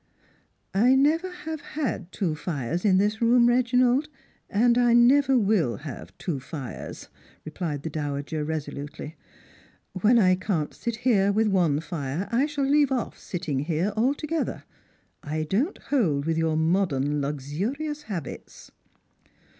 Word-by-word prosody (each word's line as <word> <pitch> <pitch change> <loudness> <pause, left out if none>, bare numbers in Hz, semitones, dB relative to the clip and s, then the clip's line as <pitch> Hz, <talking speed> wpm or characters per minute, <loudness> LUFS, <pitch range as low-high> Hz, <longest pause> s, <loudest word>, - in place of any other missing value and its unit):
"I 240 +7 +4
never 315 +7 +2
have 320 -4 -6
had 225 - -4
two 175 -6 -1
fires 155 0 -3
in 195 -3 +4
this 210 +3 +1
room, 235 +1 +5
Reginald, 250 +3 +3 0.4
and 235 +3 +3
I 240 -1 +4
never 265 +3 +5
will 200 - +2
have 145 -3 -9
two 160 -7 -3
fires," 135 -1 -7 0.4
replied 155 -2 -4
the 160 - -3
dowager, 145 0 -3
resolutely. 150 0 -5 0.4
" - - -31
When 235 +5 +5
I 185 -5 +5
can't 180 -5 -2
sit 235 -2 -4
here 200 -5 +4
with 215 +1 +2
one 170 -7 +2
fire, 160 +1 -4
I 255 +5 +2
shall 290 -2 -1
leave 285 0 +3
off 255 -3 -2
sitting 165 -7 -3
here 165 +7 -1
altogether. 285 +7 -1 0.6
I 155 +1 -3
don't 225 - 0
hold 165 - 0
with 165 0 0
your 160 -1 +1
modern 160 -4 +1
luxurious 190 - -3
habits." 190 - -8
195 Hz, 140 wpm, -26 LUFS, 155-250 Hz, 0.6 s, room